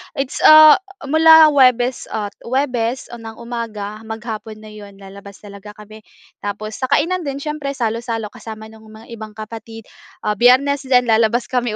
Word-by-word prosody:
it's 275 0 -4
ah, 310 +1 +8 0.2
mula 315 +1 +6
Huwebes 255 -2 +2
at 205 -2 -5
Huwebes 250 -1 -3
ng 225 -2 -10
umaga 220 -3 -7
maghapon 220 -1 -8
na 215 - -12
'yon 205 -2 -13
lalabas 200 +1 -14
talaga 205 +1 -12
kami 215 0 -14 0.4
tapos 210 +1 -6
sa 260 - -2
kainan 365 +7 0
din 275 - -3
siyempre 280 -1 -5
salo-salo 230 -2 -4
kasama 220 0 -11
nung 220 0 -17
mga 220 +2 -15
ibang 220 -2 -10
kapatid. 225 +1 -10 0.4
Ah, 210 -1 -2
Biyernes 265 +3 +3
din 250 -1 +3
lalabas 230 +2 +1
kami 245 -4 -1
230 Hz, 155 wpm, -18 LUFS, 215-260 Hz, 0.4 s, ah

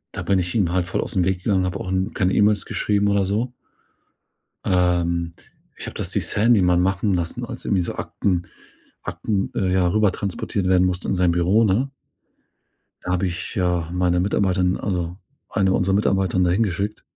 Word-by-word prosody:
da - - -3
bin 100 -1 +3
ich 90 +3 -3
ihm 95 -6 +2
halt 90 0 +1
voll - - -1
aus'm 90 - -1
Weg 95 -1 -1
gegangen, 95 -3 +2
habe 90 +1 -2
auch, 90 - -5
hm, 95 +3 -1
keine 95 -3 +1
E-Mails 105 -1 +3
geschrieben 100 -1 0
oder 100 -1 +2
so. 110 +6 -1 1.1
Ähm, 85 -2 +1 0.4
ich - - -6
habe - - -6
das - - -3
die - - +1
Sandy 110 -1 +3
mal 90 -1 +3
machen 95 +3 +1
lassen, 85 -2 -2
als - - -8
irgendwie 95 - +1
so - - -4
Akten 90 -3 -2 0.6
Akten, 100 -3 -2
äh, 95 -2 0
ja, 90 -1 +3
rüber 105 +1 +3
transportiert 100 0 -3
werden 90 0 +4
mussten 90 0 -3
in - - +1
sein 90 -1 +3
Büro, 90 +6 +3
ne? 115 +7 +1 1.1
Da 90 - -3
habe 90 +1 +1
ich, 85 -1 -5
ja, 90 -3 0
meine 90 -1 +1
Mitarbeiterin 95 -1 +1
also, 90 -2 -3 0.3
eine 95 -2 +1
unserer 95 0 +2
Mitarbeiterinnen 95 -2 +2
da 90 - +2
hingeschickt. 100 +1 -1
95 Hz, 185 wpm, -22 LUFS, 90-100 Hz, 1.1 s, werden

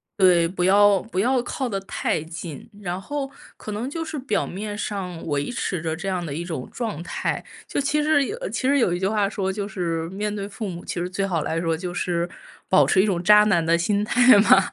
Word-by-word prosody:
对， 180 -3 +5
不 180 0 -3
要 200 +1 +5
不 200 -4 -4
要 250 +4 +2
靠 255 +2 -3
得 195 -4 -2
太 195 - -1
近。 165 - -8
然 180 -1 -3
后 280 +5 -4 0.3
可 215 - -7
能 230 +5 -3
就 325 +2 -4
是 315 -1 -5
表 255 -5 0
面 205 +2 -5
上 185 -5 -4
维 145 +2 -1
持 185 -8 -2
着 160 -1 -2
这 185 +4 -6
样 180 -2 -1
的 145 - -4
一 170 +3 -4
种 160 -7 -5
状 220 -9 -4
态， - - -2 0.2
就 - - -1
其 300 +2 +1
实 295 -2 +3
有 435 - -4
其 260 - -1
实 285 - +4
有 185 -8 +2
一 175 - -2
句 190 - +1
话 210 -1 +1
说， 195 -2 -2
就 200 +1 -3
是 165 -5 -2
面 205 +2 -3
对 200 -1 -4
父 210 0 -5
母， 175 -1 -7
其 - - -4
实 180 - -2
最 195 +1 -1
好 175 -5 -1
来 165 +2 -1
说 165 -1 0
就 180 +2 -5
是 175 -1 -1 0.4
保 190 - +6
持 190 - +4
一 200 - +2
种 180 -4 0
渣 210 +2 +7
男 175 -6 +2
的 165 +1 +4
心 200 +4 +1
态 245 -1 +6
嘛。 200 -1 +7
195 Hz, 255 characters per minute, -23 LUFS, 175-215 Hz, 0.4 s, 渣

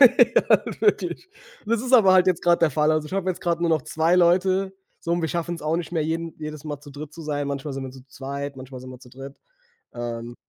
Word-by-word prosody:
halt - - +5
wirklich. 415 -2 0 0.4
Das 230 0 +1
ist 255 +2 -4
aber 210 -7 +7
halt 185 0 +5
jetzt 180 -2 +1
grade 175 -1 +4
der 165 -2 +3
Fall. 150 +2 +2
Also 155 -1 0
ich - - -12
habe 190 -1 -1
jetzt 180 - -6
grade 170 -1 -1
nur 170 - +2
noch 155 -3 +2
2 160 +6 +1
Leute. 185 +2 +3 0.3
So 170 - -2
und 175 - +1
wir 160 - -1
schaffen's 170 +1 -3
auch 155 +2 0
nicht 175 0 -5
mehr, 160 -3 0
jeden 165 +1 -3
jedes 155 0 -7
Mal 145 -2 -5
zu 145 - -13
dritt 145 +2 -9
zu 165 - -10
sein. 145 -2 -2
Manchmal 140 +1 -4
sind 135 0 -5
wir 130 - -6
zu 130 0 -15
zweit, 140 +1 -6
manchmal 130 0 -9
sind 130 0 -10
wir 125 - -10
zu 125 - -16
dritt, 135 +2 -10 0.6
ähm 120 0 -5
155 Hz, 250 wpm, -24 LUFS, 140-175 Hz, 0.6 s, aber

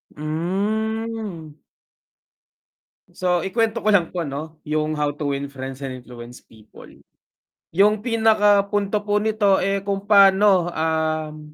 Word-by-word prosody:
Hmm. 200 +2 -3 1.6
So, 180 -1 0
ikuwento 225 +3 -1
ko 215 - +4
lang 175 -5 +3
po 175 -2 -4
ano, 150 +3 -7
yung 155 0 -1
How 145 -1 0
to 145 0 -4
win 140 0 -2
friends 135 -1 -8
and 130 - -5
influence 120 0 -12
people. 110 -1 -17 0.8
Yung 205 +4 +3
pinaka 215 -3 +3
punto 205 0 -1
po 210 0 +1
nito, 210 -2 +2
eh, 195 +1 -1
kung 200 0 -3
pa'no, 195 -3 +5
um, 155 -1 -2
185 Hz, 125 wpm, -22 LUFS, 155-210 Hz, 1.6 s, pa'no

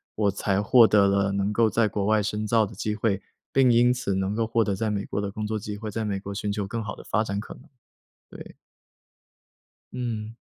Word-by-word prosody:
我 105 -2 +1
才 100 0 0
获 115 +3 +6
得 105 -2 +4
了 100 0 +1
能 100 +1 0
够 110 +1 +3
在 110 +1 +2
国 100 -1 -2
外 110 0 +2
深 105 +1 -2
造 110 0 +3
的 105 - -10
机 105 +2 -3
会， 105 -3 0 0.3
并 135 -2 +4
因 120 +1 +5
此 125 -6 -2
能 95 +1 -1
够 115 +1 -1
获 115 0 +2
得 100 -2 -1
在 110 +2 -1
美 100 -1 -2
国 - - -4
的 100 -1 -2
工 105 +2 -5
作 110 0 -2
机 105 0 -6
会， 110 0 -6
在 110 +1 -3
美 100 -2 -2
国 100 0 -6
寻 100 +1 -3
求 100 -1 -2
更 115 +4 -4
好 110 -2 -5
的 - - -12
发 110 - 0
展 100 -2 -3
可 105 - -6
能， - - -16 0.7
对。 - - -11 1.4
嗯。 115 -3 -4
105 Hz, 250 characters per minute, -25 LUFS, 100-110 Hz, 1.4 s, 获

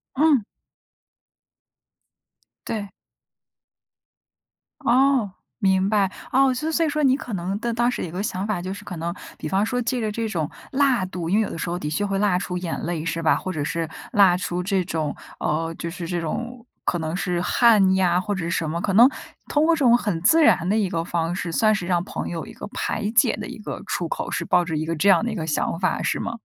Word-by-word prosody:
嗯。 285 -5 +4 2.2
对。 205 -3 -3 2.0
哦， 260 -3 +3 0.3
明 190 -1 +2
白， 200 -3 +2 0.2
哦， 265 0 +4
所 305 +6 -2
以 - - -1
所 330 +1 +2
以 - - 0
说 300 0 -1
你 265 0 +4
可 245 - -7
能 190 +2 -2
的 235 0 -2
当 240 +1 +2
时 - - -3
有 165 - -7
个 185 +4 -3
想 190 -1 -2
法， 205 -5 -1
就 185 +2 -4
是 - - -10
可 180 - -6
能， 170 +1 -3 0.2
比 - - -9
方 195 +4 +2
说 245 +1 -1
借 250 +2 -1
着 220 -2 -1
这 225 +1 -2
种 160 -6 -2 0.2
辣 265 -7 +2
度 180 -3 -5
因 195 - +2
为 220 - +4
有 - - -3
的 - - -6
时 170 - -3
候 175 - -2
的 150 -4 -4
确 205 +7 -1
会 195 -1 -1
辣 195 -3 +2
出 180 -1 -3
眼 175 -2 -3
泪， 170 -2 -3
是 165 0 -2
吧？ 160 - +4
或 185 - -4
者 155 - -3
是 165 +1 -2 0.2
辣 190 -3 +6
出 180 0 -3
这 190 0 +1
种 160 -4 -2 0.3
呃， 165 +2 -1
就 170 - -4
是 170 0 -6
这 175 -1 -2
种， 240 +8 -5 0.2
可 - - +1
能 160 0 -3
是 180 -2 -1
汗 205 -2 +4
呀， 180 -1 +2
或 205 +1 -2
者 180 -3 -3
是 170 - -2
什 165 -2 -1
么， 165 +2 -2
可 195 +2 -1
能 240 +6 +8 0.4
通 300 +1 +3
过 335 - +4
这 - - -5
种 240 -4 +5
很 200 -9 -2
自 320 - +5
然 180 - +4
的 215 - +2
一 200 -4 +1
个 165 -2 -1
方 170 0 -1
式， 180 -2 -3
算 215 +5 +3
是 180 - -3
让 175 -1 +1
朋 - - -5
友 165 -2 -4
一 - - -11
个 - - -8
排 210 +1 -2
解 225 - +4
的 210 0 -6
一 - - -8
个 - - -6
出 175 - -2
口， - - -4
是 - - -2
抱 180 -1 +3
着 160 -3 -3
一 155 - -2
个 165 +1 -2
这 190 +6 +3
样 190 +3 +5
的 - - -1
一 - - -4
个 165 -6 -3
想 160 +1 -1
法， 185 -2 0
是 - - -1
吗？ 230 0 -4
190 Hz, 255 characters per minute, -23 LUFS, 170-230 Hz, 2.2 s, 能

